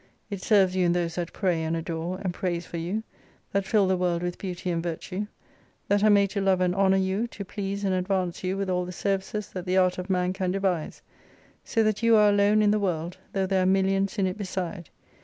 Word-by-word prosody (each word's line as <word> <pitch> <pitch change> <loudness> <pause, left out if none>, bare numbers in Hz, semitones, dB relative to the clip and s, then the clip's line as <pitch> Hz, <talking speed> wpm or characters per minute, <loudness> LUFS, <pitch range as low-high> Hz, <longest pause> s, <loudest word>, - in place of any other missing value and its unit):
It 200 -2 -4
serves 190 -3 +3
you 185 - +2
in 170 - +3
those 170 -2 -1
that 175 0 -3
pray 180 -5 0
and 160 +1 -1
adore, 165 +2 -3
and 185 -2 -1
praise 175 -1 -2
for 170 - -6
you, 180 +7 -2 0.5
that 200 -1 0
fill 210 -3 +3
the 190 0 +2
world 175 -1 0
with 175 0 -3
beauty 180 -1 -4
and 165 -1 -1
virtue; 180 +4 -4 0.6
that 205 0 +3
are 215 - +6
made 200 -1 +4
to 200 - -1
love 190 -1 +3
and 180 -1 +2
honour 195 0 +3
you, 190 +4 0
to 200 -3 -8
please 200 0 -4
and 195 -1 +1
advance 185 -1 -1
you 185 +1 -1
with 195 0 -2
all 180 -1 0
the 180 - -6
services 195 +2 -2
that 185 -1 -7
the 185 +1 +2
art 185 -1 +3
of 180 +2 -6
man 180 -1 +1
can 190 -1 -2
devise. 185 -4 -1 0.6
So 225 - +1
that 215 0 0
you 230 -1 +5
are 210 -1 +6
alone 205 +1 +4
in 205 - +4
the 210 - +2
world, 175 -2 -2 0.2
though 195 -1 +1
there 190 0 +1
are - - +2
millions 195 +1 +2
in 195 - +2
it 185 +2 -3
beside. 185 -3 -4
190 Hz, 235 wpm, -26 LUFS, 180-200 Hz, 0.6 s, are